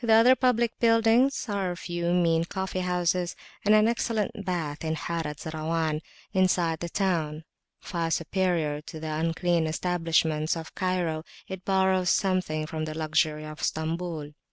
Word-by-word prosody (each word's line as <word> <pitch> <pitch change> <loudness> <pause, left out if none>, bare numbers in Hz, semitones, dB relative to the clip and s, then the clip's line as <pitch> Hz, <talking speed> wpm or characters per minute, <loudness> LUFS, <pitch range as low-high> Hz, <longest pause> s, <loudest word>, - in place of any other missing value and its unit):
The 225 -1 +4
other 235 +4 +7
public 240 -3 +1
buildings 230 +3 +4
are 200 -3 -1
a 175 - -4
few 175 -1 -2
mean 170 -2 +3
coffee 190 +1 -3
houses 180 0 0 0.3
and 210 +1 +5
an 215 +1 +5
excellent 230 -2 0
bath 165 -6 -3
in 160 0 -1
the - - -3
Harat 160 -4 -3
Zarawan, 160 0 -1 0.3
inside 175 -4 +2
the 170 - -4
town: 165 -5 -1 0.4
far 170 -3 -2
superior 165 -2 0
to 160 +1 -9
the 155 0 -4
unclean 165 +1 +1
establishments 165 -2 +1
of 160 -1 -8
Cairo, 180 -4 -1 0.2
it 190 -1 -7
borrows 190 -2 +2
something 185 -5 +1
from 155 0 -3
the 155 0 -5
luxury 155 -1 +1
of 155 0 -8
Stambul. 160 -1 -2
170 Hz, 155 wpm, -27 LUFS, 160-190 Hz, 0.4 s, other